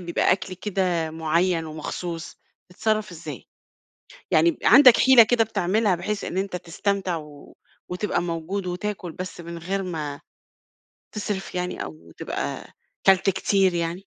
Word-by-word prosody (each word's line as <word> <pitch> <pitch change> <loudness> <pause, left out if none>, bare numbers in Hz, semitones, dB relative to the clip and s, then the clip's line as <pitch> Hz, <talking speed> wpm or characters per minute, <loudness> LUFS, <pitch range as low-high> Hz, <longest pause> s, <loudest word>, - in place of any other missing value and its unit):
فيها - - +3
أكل 185 0 -1
كده 180 -4 -1
معيّن 165 +2 0
ومخصوص، 165 +2 -6 0.3
بتتصرف 215 +2 -1
إزاي؟ 155 -6 -9 0.8
يعني 165 +2 +4
عندك 250 +1 +8
حيلة 260 -3 +8
كده 230 +1 +3
بتعملها 205 -1 +1
بحيث 200 +4 -3
إن 180 - -4
أنت 190 -1 -2
تستمتع 185 +1 -2
و 150 -2 -12 0.3
وتبقى 180 +1 -1
موجود 175 +3 -3
وتاكل، 180 0 -4
بس 180 0 -7
من 170 0 -7
غير 190 +4 -3
ما 155 -6 -4 0.9
تسرف 205 -3 -4
يعني 180 0 -3
أو 80 +1 -11
تبقى - - -4 0.4
كلت 195 0 +5
كتير 190 0 +2
يعني؟ 170 +3 -3
180 Hz, 130 wpm, -24 LUFS, 165-200 Hz, 0.9 s, عندك